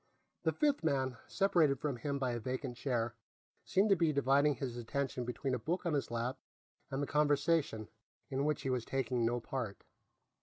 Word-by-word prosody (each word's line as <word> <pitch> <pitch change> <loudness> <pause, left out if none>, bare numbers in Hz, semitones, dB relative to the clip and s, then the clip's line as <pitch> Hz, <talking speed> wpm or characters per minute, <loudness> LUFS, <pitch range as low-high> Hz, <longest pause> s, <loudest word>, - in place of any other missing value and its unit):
The - - +2
fifth 290 - +1
man, 130 -5 +1
separated 165 -9 +3
from 145 -4 -2
him 140 +4 -2
by 130 -2 0
a 120 - -2
vacant 130 +2 -3
chair, 120 -3 -1 0.5
seemed 200 +2 +2
to - - +8
be 165 -3 +3
dividing 140 +1 +3
his 125 -2 -4
attention 125 +1 -2
between 125 +2 -2
a 125 - 0
book 170 +11 -2
on 170 - +1
his 145 - 0
lap 120 +3 -2 0.5
and 135 +1 -1
the - - +1
conversation, 145 -5 +2 0.4
in 135 -1 -1
which 150 0 0
he 135 - 0
was 125 -2 0
taking 125 -2 0
no 120 +1 0
part. 120 -4 -4
135 Hz, 185 wpm, -34 LUFS, 125-150 Hz, 0.5 s, to